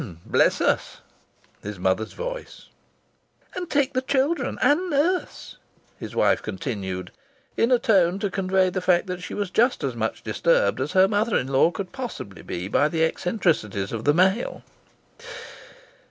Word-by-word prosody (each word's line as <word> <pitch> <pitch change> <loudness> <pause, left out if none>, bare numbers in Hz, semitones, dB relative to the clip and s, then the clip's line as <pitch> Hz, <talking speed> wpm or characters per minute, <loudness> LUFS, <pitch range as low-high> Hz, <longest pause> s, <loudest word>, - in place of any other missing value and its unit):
"Bless - - +2
us!" - - 0 0.6
His 105 -1 -6
mother's 95 +4 -1
voice. - - -7 0.8
"And 360 -2 -5
take 285 -1 +1
the 255 - +1
children 270 +2 0
and 300 +8 +2
nurse!" 335 +5 -1 0.4
His - - -8
wife - - +3
continued, 100 - -5 0.4
in 230 - +2
a 250 - +6
tone 190 -6 +3
to 200 -1 -2
convey 185 -1 +1
the 185 - -2
fact 180 0 +3
that 180 -1 -5
she - - -6
was 200 -3 -3
just 240 +6 +2
as - - -2
much - - -3
disturbed - - +1
as - - -3
her 190 0 +6
mother 210 +2 +1
in 130 - -2
law 135 +4 +4
could 185 +1 -6
possibly 235 - -7
be 90 +2 -5
by 145 +8 +2
the 160 +1 0
eccentricities 160 - 0
of 115 -1 -5
the 145 - +4
male. 190 +6 +1
190 Hz, 155 wpm, -24 LUFS, -, 0.8 s, a